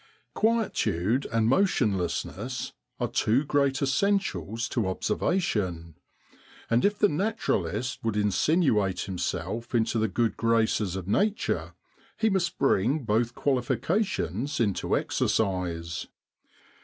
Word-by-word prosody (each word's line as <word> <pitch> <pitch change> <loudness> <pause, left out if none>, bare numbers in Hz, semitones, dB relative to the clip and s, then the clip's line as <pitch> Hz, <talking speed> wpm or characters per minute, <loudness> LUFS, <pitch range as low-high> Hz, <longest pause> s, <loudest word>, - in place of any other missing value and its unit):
Quietude 130 - +1
and 115 -1 +2
motionlessness 115 - 0 0.3
are - - 0
two 125 +7 +1
great 140 -1 +1
essentials 140 - 0
to 115 -6 0
observation; 95 - -1 0.8
and 115 +1 +3
if 205 0 +2
the 205 - +4
naturalist 130 - -1
would 110 -2 -1
insinuate 105 - +2
himself 100 +5 -3
into 115 0 +1
the 110 - +2
good 115 +3 0
graces 110 -4 +1
of 95 -1 -5
Nature 205 - 0 0.4
he 220 -1 +2
must 180 -3 0
bring 135 +3 +2
both 115 +2 0
qualifications 135 - -1
into 105 -5 +1
exercise. 85 -5 -1
115 Hz, 105 wpm, -27 LUFS, 100-145 Hz, 0.8 s, the